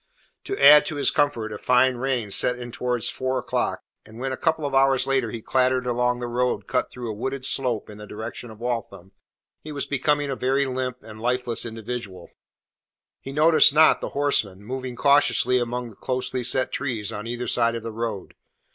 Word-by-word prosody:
To -, -, -3 dB
add 145 Hz, +2 st, +8 dB
to 155 Hz, -, -4 dB
his 145 Hz, -, +2 dB
discomfort 120 Hz, -7 st, 0 dB
a 105 Hz, -, -7 dB
fine 125 Hz, 0 st, +3 dB
rain 125 Hz, -5 st, -2 dB
set 125 Hz, +4 st, +2 dB
in 120 Hz, -1 st, -8 dB
towards 125 Hz, -1 st, -2 dB
four 130 Hz, 0 st, -2 dB
o'clock, -, -, -2 dB, 0.2 s
and 110 Hz, +1 st, -12 dB
when 135 Hz, +2 st, -3 dB
a -, -, -2 dB
couple 160 Hz, +1 st, 0 dB
of 140 Hz, -, -3 dB
hours 135 Hz, -1 st, +4 dB
later 135 Hz, -4 st, +1 dB
he 115 Hz, 0 st, -7 dB
clattered 130 Hz, -1 st, +1 dB
along 125 Hz, 0 st, 0 dB
the 120 Hz, -, -4 dB
road 125 Hz, +1 st, -1 dB
cut 125 Hz, -, -1 dB
through 120 Hz, -3 st, -6 dB
a -, -, -5 dB
wooded 130 Hz, +5 st, -4 dB
slope 125 Hz, -6 st, +1 dB
in 105 Hz, 0 st, -11 dB
the 105 Hz, -, -10 dB
direction 110 Hz, +3 st, -7 dB
of 110 Hz, -1 st, -13 dB
Waltham, 115 Hz, -6 st, -5 dB, 0.5 s
he 155 Hz, -, -9 dB
was 145 Hz, -1 st, -3 dB
become 145 Hz, +2 st, +1 dB
a 140 Hz, -2 st, -3 dB
very 135 Hz, +2 st, +1 dB
limp 130 Hz, -1 st, -4 dB
and 110 Hz, -1 st, -11 dB
lifeless 125 Hz, -1 st, -1 dB
individual. 110 Hz, -5 st, -7 dB, 0.9 s
He 135 Hz, -, -8 dB
noticed 155 Hz, 0 st, +5 dB
not 155 Hz, +1 st, +5 dB
the -, -, -4 dB
horsemen 105 Hz, -9 st, 0 dB
moving 130 Hz, +2 st, -5 dB
cautiously 135 Hz, -2 st, +3 dB
among 120 Hz, 0 st, -3 dB
the -, -, -17 dB
closely 130 Hz, +1 st, -2 dB
set 130 Hz, +2 st, +2 dB
trees 115 Hz, -7 st, -3 dB
on 105 Hz, +2 st, -6 dB
either 120 Hz, +1 st, -4 dB
side 115 Hz, -1 st, +1 dB
of 115 Hz, -, -5 dB
the 115 Hz, -, -5 dB
road. 110 Hz, -3 st, -5 dB
125 Hz, 200 wpm, -24 LUFS, 115-135 Hz, 0.9 s, add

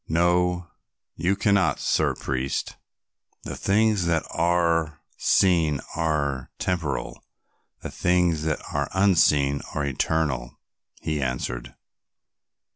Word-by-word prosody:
No, 90 Hz, +1 st, +1 dB, 0.4 s
you 90 Hz, +5 st, +1 dB
cannot, 100 Hz, -1 st, +2 dB
Sir -, -, +1 dB
Priest." 65 Hz, 0 st, -3 dB, 0.7 s
"The -, -, -6 dB
things 105 Hz, -2 st, +2 dB
that 80 Hz, -2 st, +1 dB
are 85 Hz, -2 st, +1 dB, 0.2 s
seen 85 Hz, -7 st, +3 dB, 0.2 s
are 70 Hz, -5 st, -1 dB
temporal, 85 Hz, -6 st, -3 dB, 0.6 s
the -, -, -5 dB
things 90 Hz, -3 st, +1 dB
that 80 Hz, -1 st, -1 dB
are 70 Hz, -1 st, -1 dB
unseen 75 Hz, -7 st, +3 dB
are 75 Hz, -, 0 dB
eternal," 70 Hz, -3 st, -1 dB, 0.4 s
he 80 Hz, -2 st, -2 dB
answered. 60 Hz, -1 st, -3 dB
80 Hz, 100 wpm, -25 LUFS, 70-90 Hz, 0.7 s, seen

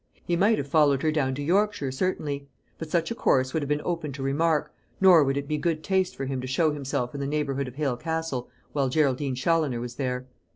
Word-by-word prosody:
He 175 Hz, -, +1 dB
might 205 Hz, +5 st, +3 dB
have 140 Hz, -, -3 dB
followed 145 Hz, -2 st, +3 dB
her 155 Hz, -, +3 dB
down 135 Hz, -4 st, 0 dB
to 145 Hz, -, -4 dB
Yorkshire, 195 Hz, -3 st, +1 dB
certainly; 140 Hz, -2 st, -2 dB, 0.3 s
but 160 Hz, -, -6 dB
such 165 Hz, +3 st, 0 dB
a -, -, +1 dB
course 130 Hz, -, +2 dB
would 160 Hz, -, 0 dB
have 145 Hz, -, -3 dB
been 150 Hz, 0 st, 0 dB
open 165 Hz, -4 st, -2 dB
to 135 Hz, 0 st, -6 dB
remark, 150 Hz, +3 st, +1 dB, 0.3 s
nor 180 Hz, -5 st, +7 dB
would 135 Hz, 0 st, 0 dB
it 140 Hz, 0 st, -3 dB
be 150 Hz, 0 st, -1 dB
good 155 Hz, -1 st, -1 dB
taste 190 Hz, 0 st, +1 dB
for 135 Hz, -, -4 dB
him 130 Hz, -1 st, -3 dB
to 130 Hz, -, -5 dB
show 155 Hz, +4 st, +2 dB
himself 135 Hz, -4 st, -3 dB
in 140 Hz, -, -5 dB
the 140 Hz, -, -2 dB
neighbourhood 140 Hz, -2 st, -1 dB
of 125 Hz, -, -9 dB
Hale 140 Hz, -4 st, -1 dB
Castle 160 Hz, -4 st, -3 dB, 0.2 s
while 140 Hz, -3 st, 0 dB
Geraldine 135 Hz, -1 st, +1 dB
Challoner 150 Hz, -2 st, +1 dB
was 120 Hz, 0 st, -6 dB
there. 125 Hz, -2 st, -2 dB
145 Hz, 235 wpm, -26 LUFS, 135-160 Hz, 0.3 s, nor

